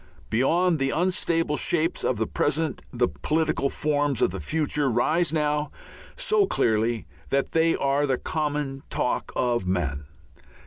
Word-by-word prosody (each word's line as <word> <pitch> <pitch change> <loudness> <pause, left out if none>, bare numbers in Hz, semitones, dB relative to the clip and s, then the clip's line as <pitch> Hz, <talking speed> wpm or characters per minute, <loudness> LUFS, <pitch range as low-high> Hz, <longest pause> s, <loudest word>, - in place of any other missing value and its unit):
Beyond 165 +8 +2
the 135 0 +1
unstable 165 -2 0
shapes 165 -1 0
of - - 0
the - - 0
present 160 +1 -1
the 120 0 +1
political 155 -3 0
forms 145 -3 0
of - - +2
the 95 - -5
future 150 - 0
rise 155 +8 +2
now 150 -1 0 0.5
so 440 -5 +2
clearly 115 - +1 0.2
that 140 0 0
they 165 0 +3
are 140 +1 +1
the 130 -2 +1
common 145 -3 -2
talk 125 - -1
of 120 -6 0
men. 75 -6 -1
145 Hz, 140 wpm, -25 LUFS, 125-160 Hz, 0.5 s, they